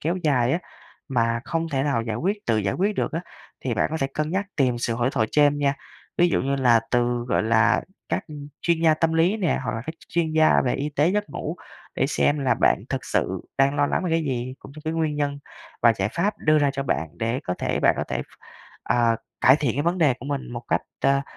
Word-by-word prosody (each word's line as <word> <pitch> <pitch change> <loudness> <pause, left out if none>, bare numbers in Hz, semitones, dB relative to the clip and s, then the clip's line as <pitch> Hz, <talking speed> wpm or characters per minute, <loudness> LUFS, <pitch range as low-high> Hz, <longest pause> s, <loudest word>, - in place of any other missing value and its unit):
kéo 170 +4 -1
dài 130 -5 +2
á, 170 - +2 0.5
mà 115 -2 +1
không 165 0 -2
thể 135 -3 0
nào 140 -6 0
giải 115 -1 -3
quyết 200 - -2
tự 115 -2 +2
giải 100 -2 -1
quyết 200 +3 0
được - - -1
á, 165 - -1 0.4
thì 125 -3 0
bạn - - +1
có 160 - -2
thể 135 - +2
cân 155 +1 -1
nhắc 195 +2 -1
tìm 125 -4 +2
sự 115 -1 -1
hỗ 120 +2 0
thoại 110 - +1
chêm 145 -1 +4
nha. 140 -1 +1 0.4
Ví 175 0 +5
dụ - - +1
như 140 +1 0
là 120 -4 +4
từ, 120 -1 +1
gọi - - +2
là, 115 +1 +3 0.3
các - - -1 0.4
chuyên 170 -1 +1
gia 160 -1 +5
tâm 160 +1 +1
lý 170 +6 +3
nè, 185 -6 0
hoặc 125 - -1
là 115 - -5
các 160 - -3
ch - - -20
chuyên 165 -2 0
gia 155 0 +5
về 125 - +1
y 145 - -2
tế 150 +3 +2
giấc 210 +2 -1
ngủ 160 +4 -4 0.4
để - - +1
xem 145 0 +1
là 135 -3 +2
bạn - - +2
thực - - -3
sự - - -1 0.2
đang 140 +1 +3
lo 145 -1 +3
lắng 185 - -1
về 175 - -1
cái 165 0 +2
gì, 130 -1 -3
cũng 140 - -13
như 155 - -8
cái 160 - -1
nguyên 160 -2 -1
nhân 145 -1 -1 0.4
và 115 -1 +7
giải 95 +1 0
pháp 195 - -1
đưa 155 0 +3
ra 145 -1 +3
cho 135 -1 -3
bạn 80 - -1
để 115 +3 -1
có 90 - -2
thể - - -1
bạn - - +4
có - - 0
thể - - -2
ph - - -22 0.4
ờ, 115 -2 +2 0.2
cải 130 +3 +7
thiện 140 -7 0
cái 145 - +1
vấn 175 +2 0
đề 150 -6 +4
của 135 - -8
mình 140 -3 -4
một 120 0 -5
cách - - +2 0.2
ta 140 0 +3
140 Hz, 260 wpm, -24 LUFS, 120-160 Hz, 0.5 s, và